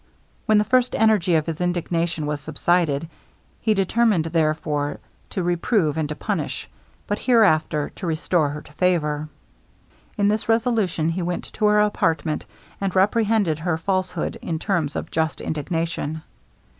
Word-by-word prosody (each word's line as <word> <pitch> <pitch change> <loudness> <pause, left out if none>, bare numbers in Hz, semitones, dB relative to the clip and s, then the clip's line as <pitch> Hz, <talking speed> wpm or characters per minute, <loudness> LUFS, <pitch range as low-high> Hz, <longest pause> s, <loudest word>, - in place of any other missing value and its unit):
When 215 - +5
the 210 - +4
first 250 +3 +2
energy 210 -6 +3
of 155 -1 +2
his 165 0 -4
indignation 170 -2 -1
was 150 0 -2
subsided, 165 -2 +1 0.5
he 220 -1 +2
determined, 195 -2 +2
therefore, 155 -2 0 0.3
to 185 - -2
reprove 175 - +1
and 155 -2 -1
to 150 - -3
punish, - - -3 0.4
but 205 - -2
hereafter 165 - +3
to 180 - -4
restore 160 -1 +1
her 150 +1 -6
to 150 - -17
favor. 155 -3 0 0.9
In 205 - +3
this 215 +2 0
resolution 225 -8 +1
he 175 +3 -2
went 175 0 -2
to 215 - 0
her 210 0 +4
apartment, 160 -7 0 0.3
and 195 -1 -1
reprehended 205 -4 +2
her 160 -1 0
falsehood 185 -1 -2
in 165 - -2
terms 165 -5 -1
of - - -4
just 160 0 0
indignation. 160 0 -3
170 Hz, 145 wpm, -23 LUFS, 155-205 Hz, 0.9 s, When